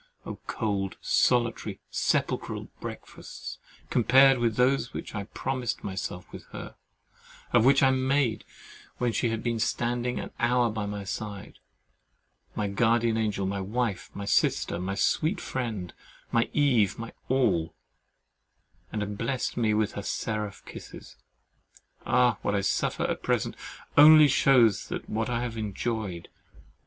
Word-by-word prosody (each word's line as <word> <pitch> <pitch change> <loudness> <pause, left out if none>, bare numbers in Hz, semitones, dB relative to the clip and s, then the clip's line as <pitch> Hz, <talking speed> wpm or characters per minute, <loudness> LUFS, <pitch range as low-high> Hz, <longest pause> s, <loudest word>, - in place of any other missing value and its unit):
Oh! - - -7
cold, 100 -4 -2
solitary, 120 -2 +1
sepulchral - - -1
breakfasts, - - -8 0.3
compared 130 +2 +5
with 115 -2 +1
those 125 +1 +2
which - - -6
I 105 -2 -4
promised 125 +1 -3
myself 95 -2 -5
with - - -10
her; - - -9 0.8
or 120 - +6
which 135 +4 +5
I 135 - +6
made 130 -3 +1 0.5
when 125 -1 0
she 115 +2 0
had 115 0 -3
been 115 -1 -1
standing 120 +2 -1
an - - -6
hour 120 -1 +2
by 105 -1 -3
my 100 0 -4
side, 100 0 -6 1.0
my 105 - -1
guardian 115 +3 +2
angel, 105 -3 -1
my 95 0 -2
wife, 105 -1 -2
my 100 - -5
sister, 85 - +1
my 95 +2 -3
sweet 160 - +1
friend, 110 -9 -4 0.4
my 115 0 +2
Eve, 125 -9 +2
my 115 0 -7 0.2
all; 105 -11 +1 1.2
and 105 -1 -2
had 105 0 -6
blest 125 +2 -2
me 115 -3 +1
with 110 -1 +1
her 100 - -5
seraph 105 0 -3
kisses! - - -11 0.9
Ah! 125 -4 +3
what 100 - 0
I 100 - +1
suffer - - 0
at - - -2
present - - 0 0.4
only 155 +1 +9
shews 130 -6 +4
what 115 +2 -2
I 120 0 -1
have 115 -2 -4
enjoyed. 105 -3 -3
115 Hz, 140 wpm, -27 LUFS, 100-125 Hz, 1.2 s, only